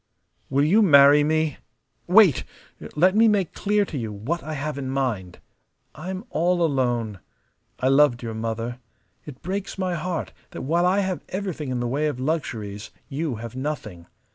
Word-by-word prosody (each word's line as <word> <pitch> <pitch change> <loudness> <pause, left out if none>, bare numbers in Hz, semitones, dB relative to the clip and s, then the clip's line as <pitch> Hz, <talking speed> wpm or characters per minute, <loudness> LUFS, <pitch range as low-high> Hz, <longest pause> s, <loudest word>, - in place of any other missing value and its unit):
"Will 140 +1 +2
you 200 +8 +4
marry 145 -5 +7
me? 155 0 0 0.5
Wait! 185 - +6 0.5
Let 185 +5 +4
me 225 +1 +6
make 200 -5 +1
clear 205 0 +1
to 150 -7 -5
you 110 -2 -4
what 125 +12 -3
I 155 - -6
have 145 0 -4
in 130 -1 -4
mind. 120 -10 -2 0.6
I'm 185 +5 -6
all 175 +2 +1
alone. 120 - 0 0.6
I 130 - +1
loved 135 -3 +4
your 115 -1 -4
mother. 115 +2 -4 0.5
It 135 -3 -10
breaks 195 +2 -4
my 185 -2 -1
heart 170 0 -3 0.2
that - - -6
while 170 +6 +2
I 195 +2 +3
have 190 -2 -3
everything 185 -7 -4
in 125 -1 -2
the 120 - -1
way 145 +5 0
of 145 -4 -3
luxuries 115 -8 -3 0.2
you 145 -2 -2
have 115 +2 -8
nothing. 120 - -5
150 Hz, 165 wpm, -24 LUFS, 120-175 Hz, 0.6 s, marry